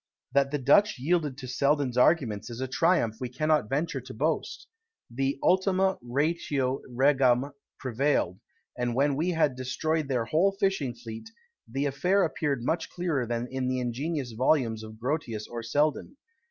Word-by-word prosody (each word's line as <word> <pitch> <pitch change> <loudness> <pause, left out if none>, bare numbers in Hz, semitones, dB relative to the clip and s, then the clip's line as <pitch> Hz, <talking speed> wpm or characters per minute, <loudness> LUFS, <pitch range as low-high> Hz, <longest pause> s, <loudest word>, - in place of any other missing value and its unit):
That 140 -1 +3
the 145 - -1
Dutch 145 +9 +4
yielded 150 0 0
to 130 -3 -7
Selden's 140 0 +1
arguments 125 -6 +2
is 120 0 -7
a 130 - -2
triumph 130 -5 +2
we 125 - -4
cannot 150 -2 +1
venture 145 -1 -1
to 130 +1 -10
boast. 160 - -2 0.5
The 135 +3 -1
ultima 190 0 +2
ratio 135 0 -1
regum 130 0 +3 0.3
prevailed; 130 -7 0 0.4
and 120 -1 -2
when 140 +2 +2
we 160 +6 0
had 160 -6 +2
destroyed 140 +5 -1
their 125 -4 0
whole 170 - +2
fishing 195 - 0
fleet, 115 - -9 0.4
the 135 +4 -2
affair 180 +9 +2
appeared 145 -6 -1
much 165 +3 -1
clearer 165 -9 -1
than 120 +1 -2
in 130 -1 -2
the 130 0 0
ingenious 130 +2 -2
volumes 115 -2 +1
of 110 0 -10
Grotius 120 -4 -3
or 120 -1 -6
Selden. 150 - 0
135 Hz, 155 wpm, -28 LUFS, 125-155 Hz, 0.5 s, Dutch